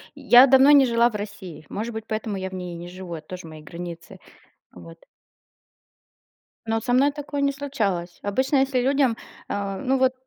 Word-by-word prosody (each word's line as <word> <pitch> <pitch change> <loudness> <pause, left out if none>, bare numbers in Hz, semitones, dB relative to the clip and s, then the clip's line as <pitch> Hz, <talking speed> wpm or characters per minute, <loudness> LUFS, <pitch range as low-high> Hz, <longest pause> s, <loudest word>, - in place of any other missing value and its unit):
я 245 +3 +7
давно 265 +2 +6
не 280 -2 +7
жила 235 0 +3
в - - -9
России, 200 -6 -7
может 225 +3 -4
быть, 220 0 -6
поэтому 215 -1 -3
я 190 -1 -4
в - - -14
ней 180 -1 -6
и - - -7
не 175 - -8
живу, 180 -1 -9
это 155 -2 -8
тоже 180 -2 -8
мои 155 -1 -11
границы. 170 +2 -9 0.6
Вот. 85 -2 -13 1.7
Ну 225 0 -1
вот 225 - -3
со 245 - 0
мной 275 +3 +4
такое 290 0 -5
не 280 0 +2
случалось. 210 -12 -3
Обычно, 260 +8 0
если 265 -1 +1
людям, 265 -2 +2 0.3
а, 200 -1 -3
ну, 265 +4 0
вот 260 0 +2
220 Hz, 195 wpm, -23 LUFS, 180-265 Hz, 1.7 s, я